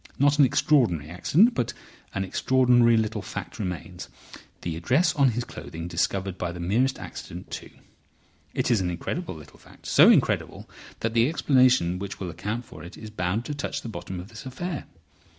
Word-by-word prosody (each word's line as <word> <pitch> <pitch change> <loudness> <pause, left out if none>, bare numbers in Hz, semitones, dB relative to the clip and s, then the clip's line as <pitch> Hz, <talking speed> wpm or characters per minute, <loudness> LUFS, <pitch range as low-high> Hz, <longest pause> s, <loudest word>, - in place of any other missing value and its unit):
Not 145 +2 +3
an 140 - +8
extraordinary 110 - +2
accident. 180 - +4
But 120 - -2 0.4
an 100 - 0
extraordinary 120 +3 +4
little 110 -1 -1
fact - - -7
remains: 90 -2 -5 0.5
the 85 -2 -3
address 140 - +2
on 140 -2 +4
his 120 +1 -2
clothing 85 -7 -8
discovered 95 +1 -1
by 85 - -2
the 90 - -8
merest 115 +10 +1
accident, 90 +2 -9
too. - - -6 0.9
It - - +1
is 110 -5 +3
an 90 - -1
incredible 145 - -4
little 75 -2 -14
fact, - - -19
so - - +7
incredible - - +2 0.3
that 115 0 -1
the 115 +3 +4
explanation 130 - +3
which 100 0 -6
will 90 -3 -4
account 105 +8 -4
for - - -12
it 85 - -10
is 110 -1 -9
bound 105 +3 -1
to 150 - -3
touch 140 - -4
the 115 - -5
bottom 95 -4 -6
of 90 +3 -9
this 110 -2 -10
affair. 150 +4 -5
110 Hz, 180 wpm, -26 LUFS, 90-130 Hz, 0.9 s, an